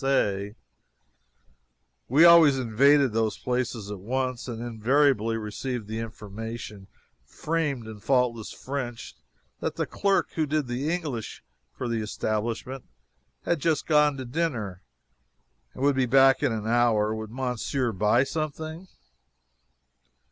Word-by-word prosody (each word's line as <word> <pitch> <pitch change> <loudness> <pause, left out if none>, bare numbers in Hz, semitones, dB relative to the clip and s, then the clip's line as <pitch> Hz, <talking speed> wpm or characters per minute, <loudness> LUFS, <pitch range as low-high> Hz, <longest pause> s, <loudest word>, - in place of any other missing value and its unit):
We 145 +7 +6
always 165 -5 +7
invaded 130 +2 +3
these 110 -1 0
places 125 -4 -3
at 100 - -6
once 130 +4 -2
and 115 -2 -5
invariably 120 0 +1
received 110 +1 -4
the 110 +1 -4
information, 110 -2 -7 0.4
framed 150 -7 -2
in 110 -1 -9
faultless 120 -1 0
French, 130 -4 -6 0.4
that - - -3
the - - -1
clerk 200 -1 0
who 155 -2 -1
did 150 0 0
the 125 +5 -2
English 150 -11 -4 0.3
for 125 - -5
the 115 -1 -1
establishment 115 +4 -3 0.6
had 170 - 0
just 155 0 0
gone 150 -2 +3
to 130 - -5
dinner 120 - -3 0.9
and 130 - -5
would 140 -1 +3
be 130 -1 +1
back 135 +1 +5
in 145 -4 +2
an 110 -1 -3
hour 110 -2 +2
would 110 -1 -5
Monsieur 125 +1 -2
buy 105 +5 +3
something? 155 +4 -5
125 Hz, 125 wpm, -26 LUFS, 110-140 Hz, 0.9 s, always